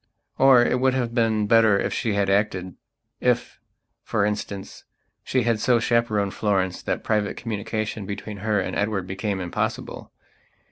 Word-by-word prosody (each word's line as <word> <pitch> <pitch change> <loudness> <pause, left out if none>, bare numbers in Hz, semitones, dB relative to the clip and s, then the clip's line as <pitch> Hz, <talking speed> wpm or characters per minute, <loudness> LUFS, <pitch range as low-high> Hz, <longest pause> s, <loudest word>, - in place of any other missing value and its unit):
Or 130 -3 +7
it 125 - +1
would 130 0 +2
have 120 -3 -1
been 110 -3 +1
better 110 -1 +5
if - - -1
she 110 - -1
had 100 -1 +1
actedif, 95 -3 -2 0.4
for 100 - 0
instance, 105 -2 -4 0.4
she 130 -2 0
had 115 -2 +1
so 120 +2 +3
chaperoned 110 -4 +1
Florence 95 -3 0
that - - -3
private 105 -2 0
communication 110 -2 -4
between 100 +1 -6
her 105 +1 0
and 95 - -3
Edward 100 -2 -1
became 95 +1 -3
impossible. 90 -2 -4
105 Hz, 145 wpm, -24 LUFS, 100-115 Hz, 0.4 s, Or